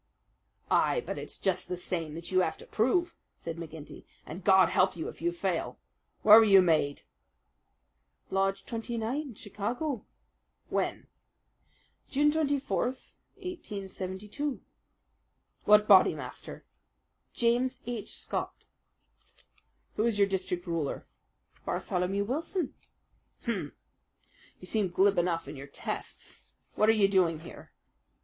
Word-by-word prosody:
"Ay, 485 Hz, -, +3 dB
but -, -, -4 dB
it's -, -, -7 dB
just 190 Hz, -2 st, -1 dB
that 180 Hz, -, -3 dB
same 165 Hz, -3 st, -4 dB
that 170 Hz, +2 st, -7 dB
you 185 Hz, -, +4 dB
have 180 Hz, -, 0 dB
to -, -, -12 dB
prove," 335 Hz, +10 st, +1 dB, 0.2 s
said 165 Hz, 0 st, -6 dB
McGinty, 160 Hz, -2 st, -9 dB, 0.2 s
"and 175 Hz, +4 st, -8 dB
God 190 Hz, -2 st, +6 dB
help 185 Hz, -, +3 dB
you 165 Hz, -, -4 dB
if -, -, -12 dB
you 170 Hz, +1 st, +1 dB
fail! 175 Hz, -1 st, -2 dB, 0.5 s
Where 215 Hz, +1 st, +10 dB
were -, -, +6 dB
you 195 Hz, -3 st, +7 dB
made?" 155 Hz, -5 st, +2 dB, 1.3 s
"Lodge 195 Hz, 0 st, 0 dB
29, 235 Hz, +3 st, -3 dB
Chicago." 235 Hz, +7 st, -4 dB, 0.6 s
"When?" -, -, -1 dB, 1.0 s
"June 295 Hz, +2 st, +3 dB
24, 285 Hz, -3 st, 0 dB, 0.5 s
1872." 210 Hz, -, -5 dB, 1.0 s
"What 210 Hz, 0 st, +6 dB
Bodymaster?" 195 Hz, -3 st, +3 dB, 0.7 s
"James 240 Hz, +2 st, +1 dB
H. 235 Hz, -3 st, -5 dB
Scott." -, -, -5 dB, 1.3 s
"Who 215 Hz, -, +2 dB
is 230 Hz, -3 st, +1 dB
your 200 Hz, -1 st, +5 dB
district 185 Hz, -2 st, -2 dB
ruler?" 165 Hz, -5 st, -2 dB, 0.6 s
"Bartholomew 185 Hz, +3 st, -1 dB
Wilson." 310 Hz, -, -2 dB, 0.7 s
"Hum! -, -, -2 dB, 0.9 s
You -, -, -11 dB
seem 210 Hz, -4 st, 0 dB
glib 190 Hz, +1 st, +3 dB
enough 170 Hz, -3 st, 0 dB
in 145 Hz, -, -7 dB
your 140 Hz, 0 st, -8 dB
tests. -, -, -6 dB, 0.3 s
What 215 Hz, -, +3 dB
are -, -, +9 dB
you 210 Hz, -3 st, +4 dB
doing 175 Hz, -5 st, +2 dB
here?" 170 Hz, -, -12 dB
195 Hz, 120 wpm, -30 LUFS, 175-235 Hz, 1.3 s, Where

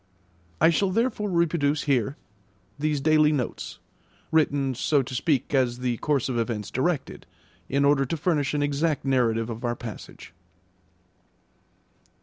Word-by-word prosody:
I 165 Hz, -, +5 dB
shall 195 Hz, +3 st, +1 dB
therefore 215 Hz, 0 st, 0 dB
reproduce 160 Hz, -4 st, +1 dB
here 135 Hz, 0 st, 0 dB, 0.6 s
these 150 Hz, -1 st, 0 dB
daily 155 Hz, +1 st, +4 dB
notes, 135 Hz, -6 st, -3 dB, 0.5 s
written, 145 Hz, -4 st, +2 dB
so 140 Hz, +3 st, +1 dB
to 130 Hz, +1 st, -8 dB
speak, 140 Hz, +1 st, 0 dB
as 125 Hz, -3 st, +2 dB
the 125 Hz, -1 st, -2 dB
course 145 Hz, -2 st, 0 dB
of 125 Hz, -3 st, -1 dB
events 110 Hz, -3 st, -3 dB
directed, 145 Hz, +3 st, -2 dB, 0.4 s
in 140 Hz, +1 st, +2 dB
order 140 Hz, -1 st, +3 dB
to 165 Hz, -, -2 dB
furnish 150 Hz, -3 st, 0 dB
an 145 Hz, -, +1 dB
exact 145 Hz, 0 st, 0 dB
narrative 120 Hz, -3 st, +1 dB
of 115 Hz, +2 st, -7 dB
our 120 Hz, 0 st, -1 dB
passage. 110 Hz, -9 st, -10 dB
140 Hz, 135 wpm, -25 LUFS, 125-155 Hz, 0.6 s, I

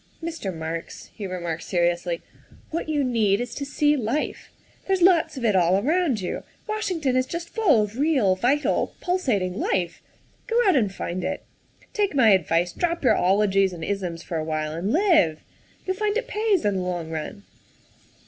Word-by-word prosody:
" -, -, -24 dB
Mr. 320 Hz, -, -5 dB
Marks," 165 Hz, 0 st, -6 dB
he 205 Hz, -, -6 dB
remarked 170 Hz, -3 st, -4 dB
seriously, 175 Hz, -1 st, 0 dB, 0.2 s
" -, -, -25 dB
what 320 Hz, 0 st, -3 dB
you 295 Hz, -2 st, +1 dB
need 220 Hz, -6 st, +2 dB
is 245 Hz, -, -4 dB
to 285 Hz, -, -4 dB
see 295 Hz, +1 st, +2 dB
life. 260 Hz, +3 st, -2 dB, 0.4 s
There's 380 Hz, -2 st, +2 dB
lots 330 Hz, -4 st, +4 dB
of 245 Hz, -, -3 dB
it 210 Hz, -3 st, +3 dB
all 180 Hz, 0 st, +4 dB
around 290 Hz, -, +1 dB
you; 180 Hz, -, -3 dB, 0.3 s
Washington 365 Hz, -11 st, -1 dB
is 255 Hz, 0 st, +2 dB
just 340 Hz, +2 st, -5 dB
full 315 Hz, -, +3 dB
of 210 Hz, +4 st, -6 dB
real, 270 Hz, -11 st, +3 dB
vital, 265 Hz, +9 st, +1 dB
pulsating 220 Hz, -, 0 dB
life. 175 Hz, -3 st, -1 dB, 0.5 s
Go 470 Hz, 0 st, +2 dB
out 380 Hz, -, +5 dB
and 215 Hz, -7 st, +2 dB
find 180 Hz, -1 st, -4 dB
it. -, -, -3 dB, 0.5 s
Take 405 Hz, -6 st, 0 dB
my 245 Hz, -5 st, +6 dB
advice, 175 Hz, -2 st, +2 dB
drop 340 Hz, -2 st, -1 dB
your 230 Hz, -5 st, +5 dB
ologies 195 Hz, 0 st, +2 dB
and 165 Hz, -2 st, -7 dB
isms 180 Hz, -3 st, -3 dB
for 165 Hz, -, -4 dB
a 155 Hz, -, -1 dB
while 155 Hz, -1 st, -2 dB
and 170 Hz, +6 st, -2 dB
live. 320 Hz, -, +3 dB, 0.4 s
You'll 375 Hz, 0 st, -2 dB
find 425 Hz, +1 st, 0 dB
it 475 Hz, 0 st, -3 dB
pays 425 Hz, -, +1 dB
in 205 Hz, -2 st, +1 dB
the -, -, -1 dB
long 175 Hz, -3 st, -3 dB
run. 160 Hz, +6 st, -5 dB
215 Hz, 185 wpm, -24 LUFS, -, 0.5 s, my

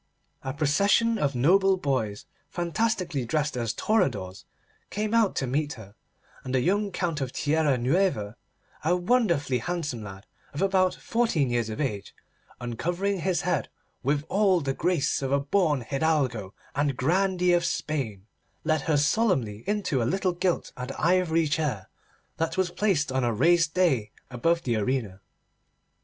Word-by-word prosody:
A 130 Hz, -, -4 dB
procession 200 Hz, -, +2 dB
of 140 Hz, -2 st, 0 dB
noble 190 Hz, +9 st, +4 dB
boys, 130 Hz, -, -2 dB, 0.2 s
fantastically 175 Hz, -, -1 dB
dressed 150 Hz, +4 st, -1 dB
as 115 Hz, -2 st, -1 dB
toreadors, 120 Hz, -, -1 dB, 0.4 s
came 210 Hz, +1 st, -2 dB
out 225 Hz, -4 st, +3 dB
to 135 Hz, -, 0 dB
meet 145 Hz, +3 st, -1 dB
her, 100 Hz, -4 st, -12 dB, 0.5 s
and 130 Hz, 0 st, -3 dB
the -, -, +4 dB
young 200 Hz, +6 st, +1 dB
Count 170 Hz, -5 st, -2 dB
of 130 Hz, -2 st, -2 dB
Tierra 150 Hz, -2 st, +1 dB
Nueva, 125 Hz, -, 0 dB, 0.5 s
a 170 Hz, +3 st, +3 dB
wonderfully 175 Hz, -, +1 dB
handsome 145 Hz, -6 st, -3 dB
lad 95 Hz, -1 st, -10 dB, 0.3 s
of -, -, -3 dB
about 190 Hz, -1 st, +2 dB
fourteen 200 Hz, -, 0 dB
years 120 Hz, -2 st, 0 dB
of 110 Hz, -, -5 dB
age, 105 Hz, -9 st, -3 dB, 0.4 s
uncovering 175 Hz, -, -2 dB
his 175 Hz, -2 st, 0 dB
head -, -, -1 dB, 0.3 s
with 145 Hz, +2 st, 0 dB
all 195 Hz, -1 st, +3 dB
the 140 Hz, -4 st, -2 dB
grace 165 Hz, -2 st, 0 dB
of 135 Hz, -1 st, -2 dB
a 140 Hz, -, +3 dB
born 150 Hz, -1 st, +1 dB
hidalgo 130 Hz, -7 st, -1 dB, 0.2 s
and 140 Hz, -2 st, 0 dB
grandee 180 Hz, +4 st, +2 dB
of 175 Hz, 0 st, +3 dB
Spain, 130 Hz, -, -3 dB, 0.4 s
led 155 Hz, -2 st, +1 dB
her 150 Hz, +1 st, +1 dB
solemnly 145 Hz, -, +1 dB
in 210 Hz, 0 st, 0 dB
to 140 Hz, -9 st, 0 dB
a -, -, +1 dB
little 190 Hz, -1 st, 0 dB
gilt 175 Hz, 0 st, -1 dB
and 125 Hz, +1 st, -5 dB
ivory 165 Hz, -1 st, +2 dB
chair 145 Hz, -10 st, -2 dB, 0.5 s
that 165 Hz, +1 st, -2 dB
was 185 Hz, -2 st, +1 dB
placed 175 Hz, -8 st, +1 dB
on 130 Hz, 0 st, 0 dB
a 120 Hz, -, +2 dB
raised 165 Hz, +7 st, +3 dB
dais 150 Hz, -13 st, +2 dB, 0.2 s
above 165 Hz, +7 st, +1 dB
the 120 Hz, -3 st, 0 dB
arena. 110 Hz, -3 st, -2 dB
155 Hz, 155 wpm, -26 LUFS, 130-185 Hz, 0.5 s, noble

